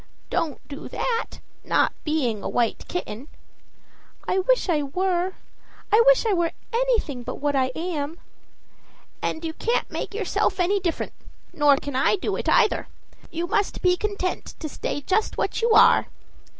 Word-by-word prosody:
"Don't 305 -4 -2
do 285 +1 -8
that, 470 -2 -2 0.2
not - - +2
being 260 -9 0
a - - -3
white 235 -2 0
kitten." 270 -7 -5 1.0
"I 380 - +2
wish - - +2
I 320 -5 +2
were 360 +5 0 0.6
I 440 - +8
wish - - +6
I 435 - +3
were 345 -2 +1 0.2
anything 460 - +1
but 250 +1 -5
what 290 0 -1
I 260 -1 +3
am." 320 -2 -3 1.0
"And 320 +1 -2
you 320 - -3
can't 470 +8 -1
make - - -4
yourself 395 -2 0
any 380 +3 +2
different, 350 -3 -2 0.4
nor 290 -2 +5
can 285 -1 -5
I 265 +10 +3
do 385 - -2
it - - -2
either. - - +3 0.4
You 335 +1 -2
must 410 +2 -1
be 360 -1 +5
content 400 -2 -3
to 315 - -4
stay 290 - -4
just 390 +8 0
what - - -1
you 465 - +2
are." 440 - +6
345 Hz, 160 wpm, -24 LUFS, 290-410 Hz, 1.0 s, I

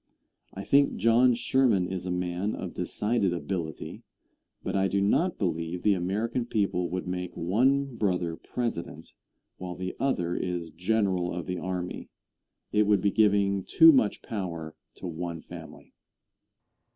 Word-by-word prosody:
I 95 - -5
think 140 +6 +3
John 120 +2 +4
Sherman 120 -6 +2
is 90 0 -4
a - - -1
man 90 +3 -2
of - - -6
decided 105 -4 0
ability, 85 -3 -4 0.6
but - - -3
I 95 0 +3
do 100 - 0
not 165 - +2
believe 85 -2 -2
the 105 - +4
American 105 +7 -1
people 95 -6 0
would 90 +1 -3
make 90 0 -4
one 125 +9 +1
brother 90 -5 0
President, 85 -8 -5 0.4
while 90 -1 -6
the 90 0 -5
other 90 -11 0
is 85 -3 -3
General 90 0 0
of 85 -1 -4
the 90 -1 -3
Army. 90 -1 -4 0.6
It 105 0 +3
would 105 -1 +4
be 100 - +2
giving 100 -2 +3
too 325 - +7
much 265 -4 +2
power 85 -8 -5 0.2
to - - -10
one 85 -1 -4
family. - - -12
95 Hz, 145 wpm, -28 LUFS, 90-110 Hz, 0.6 s, too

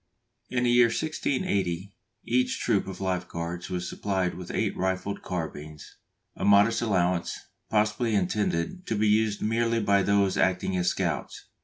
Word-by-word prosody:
In 125 -1 0
the 120 - +3
year 120 0 +6
1680 100 - -1 0.3
each 125 +2 +1
troop 100 -2 +1
of 95 - -7
Life 90 -1 -1
Guards 85 +2 -5
was 90 -1 -3
supplied 95 -3 -1
with 90 -1 -8
eight - - -1
rifled 95 +2 -2
carbines, 75 -4 -6 0.4
a - - -6
modest 100 +3 +5
allowance, 90 -5 0 0.3
possibly 110 +1 +1
intended 100 - -1
to 115 - 0
be 105 +1 +2
used 105 0 +2
merely 115 +1 +1
by 100 -2 +3
those 100 -1 +2
acting 95 0 +1
as 90 -1 +2
scouts. - - -3
100 Hz, 150 wpm, -27 LUFS, 90-110 Hz, 0.4 s, year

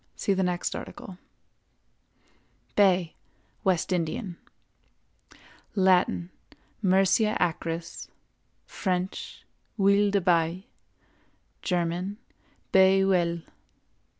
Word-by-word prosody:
See 200 - 0
the 190 - 0
next 180 -1 -1
article. 205 -7 -9 1.6
BAY 185 -4 +3 0.5
(WEST 185 -1 +1
INDIAN). 175 +3 -2 1.4
Latin—Myrcia 190 +2 +1
acris; 165 0 -3 0.6
French—(Huile 195 +2 -1
de) 200 0 +2
Bay; 175 +1 +1 1.0
German—Bay 190 +1 0
( - - +3
Oel). 170 -3 +1
185 Hz, 65 wpm, -27 LUFS, 175-195 Hz, 1.6 s, BAY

